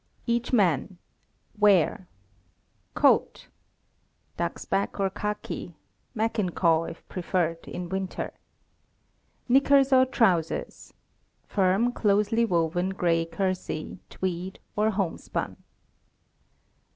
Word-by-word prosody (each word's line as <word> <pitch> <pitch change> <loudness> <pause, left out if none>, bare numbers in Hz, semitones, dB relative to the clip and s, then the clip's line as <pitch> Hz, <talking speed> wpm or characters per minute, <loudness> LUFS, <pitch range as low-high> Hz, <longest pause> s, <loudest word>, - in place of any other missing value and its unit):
EACH 235 0 0
MAN. 185 - +2 0.6
Wear: 200 -1 +3 0.9
Coat - - +2 0.9
(duxbak 200 +1 -2
or 195 -1 +1
khaki; 210 -4 -5 0.4
Mackinaw, 180 -7 +1
if 165 0 -10
preferred, 170 -2 -2
in 180 0 -5
winter). 190 +1 -4 1.1
Knickers 275 +1 +4
or 260 0 +6
trousers 180 -11 0 0.5
(firm, 195 +5 +2
closely 210 +1 +2
woven 175 -1 0
gray 170 -3 +1
kersey, 185 -2 -3
tweed, 185 0 -4 0.2
or 215 +1 +2
homespun). 195 -5 -3
190 Hz, 80 wpm, -26 LUFS, 175-215 Hz, 1.1 s, or